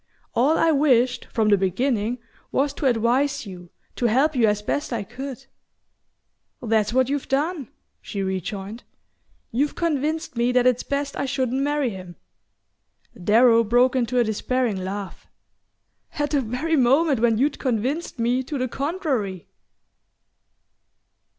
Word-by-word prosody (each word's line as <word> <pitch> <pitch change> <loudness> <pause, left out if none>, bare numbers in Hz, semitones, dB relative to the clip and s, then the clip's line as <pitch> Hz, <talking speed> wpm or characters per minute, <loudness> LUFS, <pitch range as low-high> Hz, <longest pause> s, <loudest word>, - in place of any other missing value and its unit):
All 280 +7 +3
I 330 - +3
wished, 255 -4 +2
from 220 -2 0
the 205 -2 +4
beginning, 220 +4 0 0.3
was 280 +1 +1
to 285 - -1
advise 255 +4 +1
you, 180 -3 -10 0.3
to 240 - +2
help 275 +7 +2
you 235 -3 +4
as 210 0 0
best 290 +7 -2
I 230 -4 -2
could 265 +4 -8 0.6
" - - -51 0.3
"That's 220 -2 +1
what 260 +1 +2
you've 280 0 -2
done," 290 0 -1 0.3
she 200 -1 -4
rejoined. 195 +4 -4 0.7
"You've 280 +6 0
convinced 315 -2 -1
me 240 +1 +1
that 250 -1 +3
it's 250 -1 +3
best 280 0 -3
I - - -1
shouldn't 265 -1 -1
marry 290 -3 0
him." 185 -3 -9 1.0
Darrow 230 +5 +4
broke 245 +4 +3
into 250 -1 0
a 240 - +5
despairing 220 -2 -1
laugh. 195 +1 -6 0.9
"At 290 -1 -2
the 290 -3 +2
very 255 +8 -1
moment 270 +2 +3
when 230 -1 +3
you'd 285 +4 0
convinced 260 +7 -2
me 240 +2 +1
to 280 +3 -5
the 255 0 -1
contrary!" 270 - -2
250 Hz, 145 wpm, -23 LUFS, 220-280 Hz, 1.0 s, a